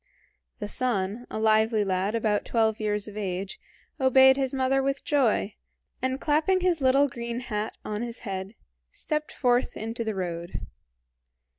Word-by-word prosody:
The 205 - -5
son, 225 -1 -1
a - - -5
lively 220 0 +3
lad 195 +2 0
about 215 -2 +1
twelve 220 -2 +1
years 210 -1 -1
of 210 - -9
age, 195 -2 -4 0.4
obeyed 265 0 +6
his 265 -1 0
mother 270 0 +1
with 275 +1 -1
joy, 245 -7 +1 0.5
and 260 +1 -1
clapping 320 +6 +2
his 355 -4 +1
little 270 +2 +4
green 235 -2 -5
hat 215 -3 -3
on 210 0 -3
his 235 -1 -5
head, 195 0 -5 0.3
stepped 305 - -3
forth 245 -1 +1
into 225 +2 -4
the 220 -2 -3
road. 170 -2 -4
230 Hz, 150 wpm, -27 LUFS, 210-265 Hz, 0.5 s, obeyed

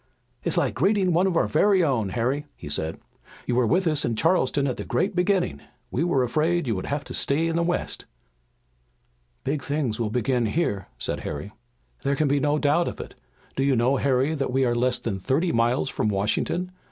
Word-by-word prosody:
"It's - - -1
like - - +1
greeting 185 +5 +2
one 180 +4 +3
of 175 -3 0
our - - +3
very 190 +3 +3
own, 120 -10 +1
Harry," 130 +8 -1
he 75 - -9
said. 80 +2 -2 0.5
"You 125 - -1
were 120 -1 +3
with 180 - +2
us 155 -3 +1
in 115 - 0
Charleston 145 -1 +2
at 130 -3 -1
the - - -4
great 185 +11 -1
beginning. 180 0 +1 0.3
We 135 - 0
were 155 -7 +2
afraid 160 +7 +1
you 115 -4 0
would 95 - -4
have 145 0 -2
to - - -8
stay 150 +4 +1
in 165 0 -1
the 170 - +2
west." 175 +1 -2 1.4
"The 135 - -1
big 150 -1 -2
things 140 -7 -2
will 115 -2 0
begin 120 +1 0
here," 105 - -1
said - - -2
Harry. 75 +8 -5 0.5
"There 140 0 0
can 150 +1 +1
be 140 +1 +2
no 150 +1 +1
doubt 150 +4 +2
of - - -5
it. - - -7 0.4
Do - - -1
you 135 -1 +3
know, 125 +4 +2
Harry, 135 +3 +1
that 140 -4 -2
we 130 +1 +2
are 120 - +2
less 125 +1 +2
than 100 -4 -4
thirty 145 - +1
miles 120 +3 +1
from 110 - -1
Washington! 110 - -1
140 Hz, 215 wpm, -25 LUFS, 120-165 Hz, 1.4 s, one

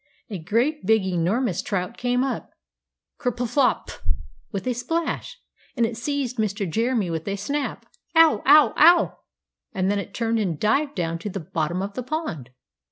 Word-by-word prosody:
A 195 - -4
great 235 - 0
big 220 -3 +3
enormous 185 +4 0
trout 195 +2 -3
came 245 +1 0
up 270 - -3 0.7
ker 250 -3 0
pflop 245 +3 +1
p - - -8
p - - -15
p! - - +1 0.4
with 200 0 -4
a 250 - +1
splash 325 +7 -3 0.4
and 235 - +3
it 225 0 -3
seized 255 +1 -2
Mr. 205 -2 -1
Jeremy 225 0 0
with 160 +1 -4
a 200 - -1
snap, 280 +9 -3 0.3
"Ow! 325 -1 +6
Ow! 295 +1 +7
Ow!" 345 +3 +5 0.5
and 190 +1 +1
then 205 - 0
it 200 0 -7
turned 230 -1 0
and 180 -8 -1
dived 280 +7 +1
down 165 -3 -2
to 205 - -5
the 195 - -4
bottom 165 +2 -2
of 200 +1 -5
the 255 - -4
pond! 250 - -4
225 Hz, 180 wpm, -24 LUFS, 190-260 Hz, 0.7 s, Ow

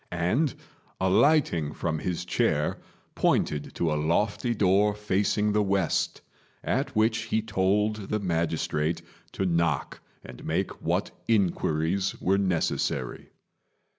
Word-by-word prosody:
and, 90 - 0 0.4
alighting 95 - +3
from 80 0 -2
his 90 +1 -3
chair, - - 0 0.3
pointed 75 -1 0
to 85 -2 0
a - - +2
lofty 100 +10 0
door 100 +1 +3
facing 105 +1 +1
the 105 - +3
west, 95 -4 0 0.4
at - - -1
which 110 +1 +3
he 110 - 0
told 105 0 +1
the 105 - 0
magistrate 80 -3 -1 0.3
to 95 - -2
knock 85 -5 0 0.2
and 65 - -11
make - - -2
what - - -1 0.2
inquiries 95 -3 +1
were 95 +2 +2
necessary. 90 -4 -1
95 Hz, 115 wpm, -27 LUFS, 85-105 Hz, 0.4 s, alighting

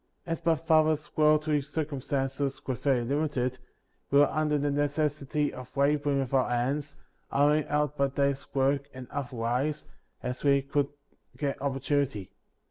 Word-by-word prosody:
55. 165 - -5
As 165 - -3
my 165 - +5
father's 155 -1 +2
worldly 150 -1 +3
circumstances 140 -2 -2
were 130 - -1
very 130 -1 +1
limited, 130 -1 -1 0.5
we 140 - +3
were 145 - +5
under 155 -1 +1
the 145 0 0
necessity 145 0 0
of 130 +1 -10
laboring 140 0 +2
with 135 0 -4
our 130 -2 +3
hands, 135 +5 -1 0.4
hiring 150 +2 +3
out 150 0 0
by 140 - +3
da/s 140 0 -1
work 140 +1 +1
and 130 -1 -8
other 140 -2 -4
wise, 125 +6 -1 0.4
as 125 0 -4
'we 140 -1 +4
could 140 +1 0 0.5
get 140 -1 -2
opportunity. 135 -6 -1
140 Hz, 150 wpm, -29 LUFS, 135-150 Hz, 0.5 s, my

